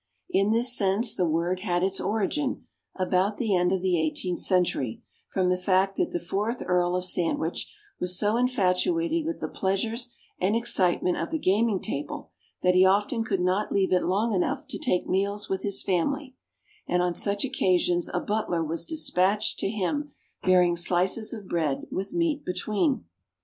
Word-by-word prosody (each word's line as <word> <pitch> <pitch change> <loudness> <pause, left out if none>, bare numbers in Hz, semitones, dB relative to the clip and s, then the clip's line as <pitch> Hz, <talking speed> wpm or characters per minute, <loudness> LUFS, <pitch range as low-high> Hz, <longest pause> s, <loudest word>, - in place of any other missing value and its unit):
In 200 - +2
this 240 +3 +3
sense, 205 +3 +1
the 175 -2 0
word 170 +3 0
had 180 -2 -1
its 190 0 0
origin, 245 +7 -1 0.3
about 185 +2 +1
the 220 -5 +1
end 180 0 +2
of 190 -1 -1
the 180 -3 +2
eighteenth 175 +3 -1
century, 175 - +1 0.3
from 185 -2 +1
the 180 - +2
fact 190 +1 +1
that - - +1
the 175 - -2
fourth 205 +8 -2
Earl 180 0 +1
of 180 - -1
Sandwich 170 -2 -1 0.3
was 180 0 +3
so 210 +2 +2
infatuated 255 - +1
with 330 - -3
the - - -3
pleasures 225 +5 -2 0.3
and 195 +4 +1
excitement 185 -6 +2
of - - -3
the 320 - -1
gaming 215 -4 +2
table 145 +1 -5 0.3
that 180 - +4
he 185 +1 +6
often 205 +5 +2
could 195 -4 -1
not 185 +4 0
leave 190 -2 +2
it 180 - +3
long 210 +5 +1
enough 265 +10 -1
to - - -2
take 180 -8 +1
his - - -12
meals 200 +2 0
with 190 0 -1
his 200 -1 -1
family; 260 - -1 0.5
and, 180 0 +1
on 180 -1 0
such 200 +5 0
occasions, 180 -8 +1
a 180 - 0
butler 190 -5 -1
was 160 +1 -2
despatched 210 - +1
to - - 0
him 285 +9 -2 0.3
bearing 180 -2 +4
"slices 185 +5 +1
of 210 -5 -7
bread 155 -6 -1
with 195 +1 -3
meat 330 -4 0
between." 210 - -1
190 Hz, 175 wpm, -26 LUFS, 180-225 Hz, 0.5 s, he